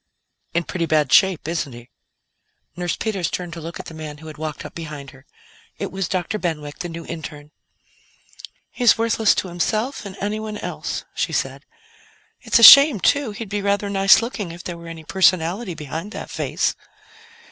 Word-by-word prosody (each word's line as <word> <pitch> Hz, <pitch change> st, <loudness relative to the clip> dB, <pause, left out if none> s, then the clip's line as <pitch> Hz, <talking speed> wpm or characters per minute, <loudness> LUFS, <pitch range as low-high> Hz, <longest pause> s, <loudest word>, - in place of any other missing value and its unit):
"In 170 Hz, -, +2 dB
pretty 170 Hz, 0 st, -3 dB
bad 150 Hz, -4 st, +2 dB
shape, 190 Hz, -6 st, +4 dB
isn't 165 Hz, -5 st, -3 dB
he?" 120 Hz, +1 st, -13 dB, 0.8 s
Nurse 175 Hz, -1 st, -2 dB
Peters 200 Hz, -6 st, -2 dB
turned 175 Hz, -2 st, -5 dB
to 165 Hz, -, -7 dB
look 165 Hz, +2 st, -7 dB
at -, -, -7 dB
the -, -, -9 dB
man 155 Hz, -2 st, -8 dB
who 160 Hz, -, -14 dB
had 155 Hz, -1 st, -9 dB
walked 155 Hz, -1 st, -5 dB
up -, -, -9 dB
behind 150 Hz, -4 st, -8 dB
her. 135 Hz, 0 st, -19 dB, 0.5 s
It -, -, -4 dB
was 190 Hz, -1 st, -2 dB
Dr. 190 Hz, +2 st, -2 dB
Benwick, 150 Hz, -4 st, -4 dB
the 175 Hz, -, -4 dB
new 165 Hz, 0 st, -7 dB
interne. 150 Hz, -2 st, -8 dB, 1.2 s
"He's 245 Hz, -3 st, +4 dB
worthless 225 Hz, -1 st, +2 dB
to -, -, -2 dB
himself 215 Hz, -, -2 dB
and 195 Hz, -3 st, -9 dB
anyone 215 Hz, +1 st, -3 dB
else," -, -, -5 dB
she -, -, -2 dB
said. -, -, -3 dB, 0.7 s
"It's -, -, +2 dB
a 230 Hz, -, +3 dB
shame, 280 Hz, -2 st, +10 dB
too; 285 Hz, +5 st, +2 dB
he'd 215 Hz, +1 st, -7 dB
be 205 Hz, +1 st, -3 dB
rather 200 Hz, 0 st, 0 dB
nice 195 Hz, +3 st, +5 dB
looking 215 Hz, -7 st, -5 dB
if 175 Hz, +1 st, -10 dB
there 175 Hz, -, -5 dB
were 170 Hz, -, -11 dB
any 165 Hz, -1 st, -9 dB
personality 185 Hz, +2 st, +1 dB
behind 160 Hz, -, -6 dB
that -, -, -7 dB
face." -, -, -1 dB
175 Hz, 180 wpm, -21 LUFS, 160-205 Hz, 1.2 s, shame